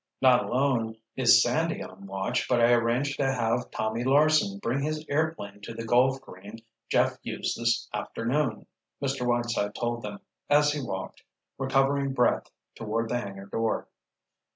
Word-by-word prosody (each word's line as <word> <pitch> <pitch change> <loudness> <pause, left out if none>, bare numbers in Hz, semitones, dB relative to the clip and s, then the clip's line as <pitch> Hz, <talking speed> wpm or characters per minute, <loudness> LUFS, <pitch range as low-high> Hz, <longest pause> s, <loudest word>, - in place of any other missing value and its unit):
"Not 130 -2 +5
alone 120 -4 0 0.2
is - - +6
Sandy - - 0
on 95 +2 -11
watch, 95 0 -2
but 125 - +3
I 120 0 +5
arranged 120 +4 +1
to 135 -1 +2
have 120 -1 0
Tommy 110 +2 -2
Larsen 145 -6 +3
bring 120 +7 -1
his 155 +1 -2
airplane 145 -10 -2
to 115 +2 -8
the 115 0 -5
golf 130 +3 +3
green 100 0 -11 0.3
Jeff - - +2
used - - -3
this 115 0 +1
afternoon," 120 0 -2 0.3
Mr. 135 -3 -2
Whiteside 120 -4 0
told 120 -1 -2
them, 105 -2 -6 0.3
as 145 0 +5
he 145 0 -3
walked, 95 -7 -5 0.4
recovering 135 +1 +1
breath, 125 -2 +2 0.3
toward 115 +1 -2
the 120 - 0
hangar 100 -4 -7
door. 115 +3 -2
120 Hz, 155 wpm, -27 LUFS, 110-135 Hz, 0.4 s, is